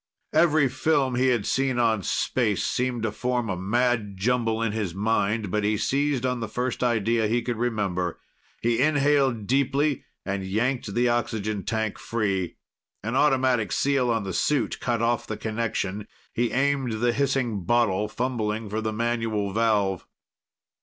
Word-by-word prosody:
Every 155 Hz, -4 st, +4 dB
film 135 Hz, 0 st, +1 dB
he 125 Hz, +2 st, +2 dB
had 120 Hz, -5 st, +1 dB
seen 135 Hz, -1 st, 0 dB
on 115 Hz, -3 st, +2 dB
space -, -, 0 dB
seemed 125 Hz, -2 st, -1 dB
to 110 Hz, -, 0 dB
form 120 Hz, 0 st, -1 dB
a -, -, -1 dB
mad 105 Hz, +1 st, 0 dB
jumble 115 Hz, +1 st, +1 dB
in 115 Hz, -, 0 dB
his 105 Hz, -5 st, -3 dB
mind, 105 Hz, 0 st, 0 dB
but 105 Hz, +1 st, 0 dB
he 105 Hz, +1 st, +1 dB
seized 140 Hz, +1 st, 0 dB
on 125 Hz, -1 st, 0 dB
the 115 Hz, -, -3 dB
first 125 Hz, +3 st, -2 dB
idea 115 Hz, -1 st, +2 dB
he 120 Hz, +2 st, 0 dB
could 120 Hz, -1 st, -2 dB
remember. 100 Hz, -7 st, -1 dB, 0.4 s
He 120 Hz, +1 st, +2 dB
inhaled 140 Hz, -6 st, +2 dB
deeply 140 Hz, +3 st, +1 dB, 0.2 s
and 95 Hz, 0 st, -2 dB
yanked 110 Hz, +4 st, -1 dB
the 120 Hz, +1 st, +3 dB
oxygen 110 Hz, -4 st, -1 dB
tank 110 Hz, -2 st, -2 dB
free. 100 Hz, -6 st, -1 dB, 0.5 s
An 115 Hz, +4 st, -2 dB
automatic 130 Hz, -7 st, +2 dB
seal 135 Hz, -3 st, +1 dB
on 115 Hz, -2 st, +1 dB
the 95 Hz, -1 st, -4 dB
suit 140 Hz, -, 0 dB
cut 120 Hz, -2 st, -1 dB
off 120 Hz, 0 st, 0 dB
the 110 Hz, -, -4 dB
connection. 110 Hz, -2 st, -3 dB, 0.3 s
He 120 Hz, 0 st, 0 dB
aimed 135 Hz, -2 st, +1 dB
the 120 Hz, +2 st, +1 dB
hissing 130 Hz, -7 st, 0 dB
bottle, 105 Hz, -2 st, +2 dB
fumbling 110 Hz, -3 st, -2 dB
for 110 Hz, +1 st, -1 dB
the 110 Hz, 0 st, -2 dB
manual 115 Hz, -3 st, -1 dB
valve. 105 Hz, -4 st, +1 dB
115 Hz, 160 wpm, -25 LUFS, 105-125 Hz, 0.5 s, Every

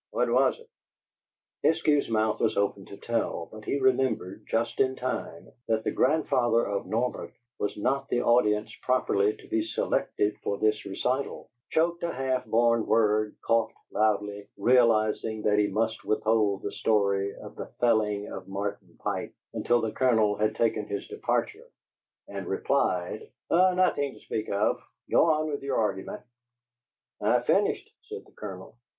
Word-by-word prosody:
"What -, -, 0 dB
was -, -, +3 dB
it?" 470 Hz, -, -17 dB, 1.0 s
Eskew's 155 Hz, -4 st, +2 dB
mouth 110 Hz, -1 st, +1 dB
was 110 Hz, -, +1 dB
open 100 Hz, -1 st, 0 dB
to 100 Hz, -, -10 dB
tell, 115 Hz, -8 st, -2 dB
but 110 Hz, 0 st, -11 dB
he -, -, 0 dB
remembered, 125 Hz, -7 st, 0 dB
just 115 Hz, +1 st, -1 dB
in 130 Hz, 0 st, +2 dB
time, 125 Hz, -9 st, -5 dB, 0.2 s
that 110 Hz, -1 st, +1 dB
the -, -, 0 dB
grandfather 125 Hz, -5 st, +2 dB
of 100 Hz, 0 st, -3 dB
Norbert 120 Hz, +3 st, -2 dB, 0.3 s
was 105 Hz, -, -2 dB
not 135 Hz, +6 st, -1 dB
the 120 Hz, -, +1 dB
audience 105 Hz, -3 st, +2 dB
properly 105 Hz, -5 st, +2 dB
to -, -, -16 dB
be 110 Hz, -, 0 dB
selected 105 Hz, -1 st, -1 dB
for 100 Hz, -, -2 dB
this 110 Hz, 0 st, +1 dB
recital, 125 Hz, +7 st, -2 dB, 0.2 s
choked 170 Hz, +2 st, +1 dB
a 170 Hz, -, -1 dB
half 130 Hz, -1 st, -1 dB
born 115 Hz, 0 st, +3 dB
word, 110 Hz, -1 st, +2 dB
coughed 115 Hz, -1 st, +1 dB, 0.2 s
loudly, 105 Hz, -1 st, 0 dB
realizing 110 Hz, -3 st, +3 dB
that 105 Hz, 0 st, +3 dB
he 105 Hz, -, +3 dB
must 110 Hz, +1 st, -1 dB
withhold 110 Hz, -2 st, +1 dB
the -, -, -3 dB
story 100 Hz, -2 st, +1 dB
of -, -, -11 dB
the -, -, -6 dB
felling 105 Hz, -4 st, +2 dB
of -, -, -8 dB
Martin 100 Hz, -2 st, -5 dB
Pike -, -, -3 dB, 0.2 s
until 120 Hz, 0 st, +1 dB
the 110 Hz, -, -1 dB
Colonel 110 Hz, -5 st, +2 dB
had 110 Hz, +1 st, 0 dB
taken 115 Hz, -1 st, 0 dB
his 405 Hz, 0 st, -4 dB
departure, 435 Hz, +2 st, -2 dB, 0.6 s
and -, -, -6 dB
replied: 445 Hz, 0 st, -1 dB, 0.2 s
"Nothin' 180 Hz, -6 st, +3 dB
to -, -, -15 dB
speak 110 Hz, -, -4 dB
of. 100 Hz, +2 st, +1 dB, 0.3 s
Go -, -, +5 dB
on 155 Hz, 0 st, +1 dB
with 145 Hz, -, -3 dB
your 140 Hz, -1 st, -1 dB
argument." 105 Hz, -3 st, -2 dB, 1.0 s
"I've -, -, +2 dB
finished," -, -, +2 dB
said -, -, -9 dB
the -, -, -21 dB
Colonel. 95 Hz, -1 st, -9 dB
110 Hz, 155 wpm, -27 LUFS, 105-130 Hz, 1.0 s, Go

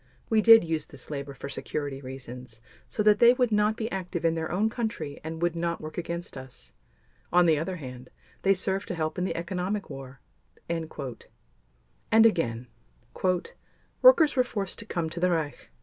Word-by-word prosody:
"We 220 Hz, -1 st, +5 dB
did 225 Hz, -1 st, +9 dB
use 160 Hz, -2 st, -2 dB
this 140 Hz, -3 st, -12 dB
labor 140 Hz, -1 st, -5 dB
for 140 Hz, -, -7 dB
security 140 Hz, 0 st, -4 dB
reasons 125 Hz, -3 st, -9 dB, 0.3 s
so 210 Hz, -, -2 dB
that 210 Hz, 0 st, +5 dB
they 240 Hz, +1 st, +8 dB
would 250 Hz, -2 st, +1 dB
not 210 Hz, +1 st, +2 dB
be 225 Hz, 0 st, -3 dB
active 180 Hz, -3 st, -3 dB
in 165 Hz, -, +3 dB
their 160 Hz, -1 st, -3 dB
own 200 Hz, +5 st, +2 dB
country 220 Hz, -, -4 dB
and 160 Hz, +1 st, -5 dB
would 175 Hz, -1 st, +1 dB
not 170 Hz, 0 st, -1 dB
work 155 Hz, 0 st, -8 dB
against 170 Hz, 0 st, -4 dB
us. 130 Hz, -, -11 dB, 0.6 s
On 175 Hz, 0 st, +5 dB
the 160 Hz, -3 st, +4 dB
other 180 Hz, +4 st, -3 dB
hand, 125 Hz, -5 st, -9 dB, 0.3 s
they 195 Hz, 0 st, +4 dB
served 190 Hz, +1 st, -1 dB
to 180 Hz, -, -3 dB
help 155 Hz, +1 st, -2 dB
in 180 Hz, -, 0 dB
the -, -, -2 dB
economic 180 Hz, +3 st, -3 dB
war." 135 Hz, -1 st, -9 dB, 0.5 s
And 165 Hz, -1 st, -3 dB, 1.4 s
again: 125 Hz, -, +1 dB, 1.4 s
"Workers 405 Hz, -13 st, +7 dB
were 255 Hz, -, +4 dB
forced 200 Hz, -6 st, -4 dB
to 225 Hz, -, -6 dB
come 170 Hz, -5 st, -2 dB
to 170 Hz, -, -5 dB
the 180 Hz, +1 st, +3 dB
Reich. 160 Hz, -4 st, -2 dB
170 Hz, 180 wpm, -27 LUFS, 145-200 Hz, 1.4 s, did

